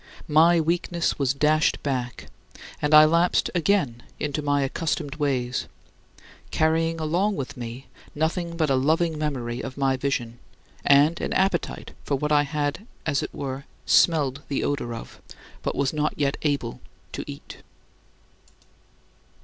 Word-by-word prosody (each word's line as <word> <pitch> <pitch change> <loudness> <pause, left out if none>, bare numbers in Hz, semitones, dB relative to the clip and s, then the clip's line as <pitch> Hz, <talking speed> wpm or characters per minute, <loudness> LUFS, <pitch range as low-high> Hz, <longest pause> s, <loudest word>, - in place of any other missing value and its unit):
My 165 +3 +5
weakness 170 +1 0
was 135 -1 +1
dashed 155 +2 +2
back, 125 -3 -3 0.6
and 150 - 0
I 155 0 +9
lapsed 170 +3 +2
again 165 - +1 0.2
into 150 0 -2
my 145 -1 +1
accustomed 150 +1 -2
ways, 130 -4 -1 0.8
carrying 165 +1 +1
along 175 +7 +1
with 145 -1 -5
me 120 +1 -7 0.3
nothing 170 +2 -1
but 155 -4 +1
a - - +4
loving 155 +4 +1
memory 125 -5 -2
of 130 - -7
my 135 -1 +1
vision, 120 -3 -2 0.4
and 145 +4 +4
an - - -2
appetite 190 -2 0
for 140 - 0
what 150 +2 -2
I 145 -1 +5
had, 150 +7 -3 0.2
as 150 -3 +1
it - - -5
were, 135 0 -5 0.2
smelled 145 -5 +3
the 140 - -1
odor 130 -5 -2
of, 115 - -10 0.4
but - - -2
was 140 0 0
not 150 0 0
yet 140 -1 +1
able 140 -6 -2 0.3
to - - -5
eat. - - -9
150 Hz, 140 wpm, -25 LUFS, 135-160 Hz, 0.8 s, I